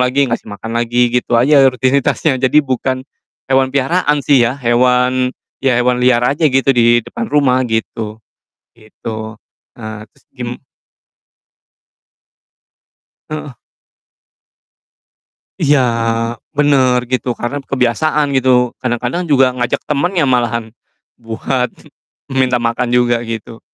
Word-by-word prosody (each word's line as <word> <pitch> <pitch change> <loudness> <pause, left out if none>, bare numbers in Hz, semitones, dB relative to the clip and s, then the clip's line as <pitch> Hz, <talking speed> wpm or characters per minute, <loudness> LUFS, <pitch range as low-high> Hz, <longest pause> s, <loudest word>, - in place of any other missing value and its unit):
lagi 125 +3 +2
ngasih 115 -1 -4
makan 110 +2 -7
lagi 120 0 +1
gitu 125 -1 0
aja 140 +4 +5
rutinitasnya. 130 +2 +1
Jadi 135 +4 +3
bukan 130 0 -2 0.5
hewan 130 0 +3
peliharaan 145 +1 +1
sih, 140 -3 +4
ya, 125 +3 -2
hewan, 125 0 +2 0.3
ya, 130 -2 +2
hewan 125 0 +1
liar 125 -1 +3
aja 145 +5 +2
gitu 135 0 +2
di 120 -1 +3
depan 235 -1 -5
rumah 130 -3 +2
gitu, 110 -1 -3 0.6
gitu. 110 0 -8 0.4
Eee, 110 -2 -7
terus - - -30
gim 125 -2 -5 2.8
Heeh. 150 -3 -6 2.1
Iya, 145 0 +4 0.8
bener 135 -4 +3
gitu, 130 0 -1
karena 120 +4 -3
kebiasaan 140 +4 +1
gitu. 130 0 +2 0.3
Kadang-kadang 125 +6 -2
juga 135 -2 +5
ngajak 125 -1 -1
temennya 165 +3 0
malahan, 120 -3 +1 0.6
buat 125 +3 -2 0.7
minta 125 -1 +2
makan 120 +1 -1
juga 120 -1 +3
gitu. 115 0 -7
125 Hz, 110 wpm, -15 LUFS, 120-135 Hz, 2.8 s, aja